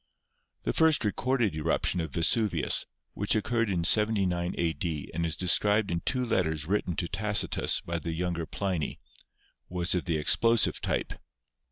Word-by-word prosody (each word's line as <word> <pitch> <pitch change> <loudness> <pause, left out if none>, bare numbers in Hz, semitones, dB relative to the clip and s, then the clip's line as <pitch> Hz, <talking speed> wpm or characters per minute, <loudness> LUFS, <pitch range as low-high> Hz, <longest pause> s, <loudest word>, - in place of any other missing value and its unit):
The - - -1
first 160 -6 +3
recorded 120 -2 0
eruption 80 +3 0
of 80 - -4
Vesuvius, 105 +6 +1 0.3
which 105 +2 0
occurred 115 +1 0
in 90 -3 -1
79 95 -3 +1
a.d. 80 -2 -3
and 85 +1 -1
is 80 - -1
described 105 +3 +4
in 85 - -1
two 125 +7 -1
letters 80 -9 -1
written 90 -1 -1
to 85 - -2
Tacitus 100 +3 0
by 85 0 -4
the 85 +1 -5
younger 85 -1 -3
Pliny, 95 -6 -3 0.7
was 90 -1 0
of 90 - -1
the 85 -3 0
explosive 115 +9 +3
type. - - -2
90 Hz, 150 wpm, -28 LUFS, 85-105 Hz, 0.7 s, described